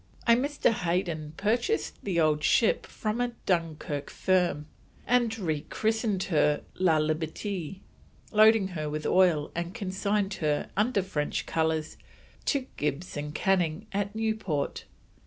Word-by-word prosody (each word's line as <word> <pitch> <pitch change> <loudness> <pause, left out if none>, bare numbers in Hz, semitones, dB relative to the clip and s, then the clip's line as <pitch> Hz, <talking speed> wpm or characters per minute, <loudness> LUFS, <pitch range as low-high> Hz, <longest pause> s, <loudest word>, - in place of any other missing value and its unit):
A 235 - +6
Mr. 280 +2 +2
Hayden 170 -6 -2
purchased 235 - 0
the 185 -4 0
old 155 -1 +2
ship 225 +9 +3
from 215 +2 -2
a 245 -1 -1
Dunkirk 160 -5 -1
firm 180 -5 +1 0.4
and 240 -2 +2
re 160 -7 -1
christened 220 -3 0
her 150 -4 +2
La 175 -4 +3
Liberte, 160 +4 -2 0.5
loaded 215 -2 +5
her 155 -3 -3
with 150 0 -4
oil 175 -5 +3
and 170 +2 -4
consigned 200 +1 -1
her, 150 -1 0
under 210 -1 +2
French 150 -6 -2
colours, 160 -1 -1 0.5
to 280 -3 +1
Gibbs 150 +4 -2
and 150 0 -5
Canning 185 -1 +1
at 200 +1 -2
Newport. 215 -10 -2
185 Hz, 130 wpm, -28 LUFS, 155-215 Hz, 0.5 s, A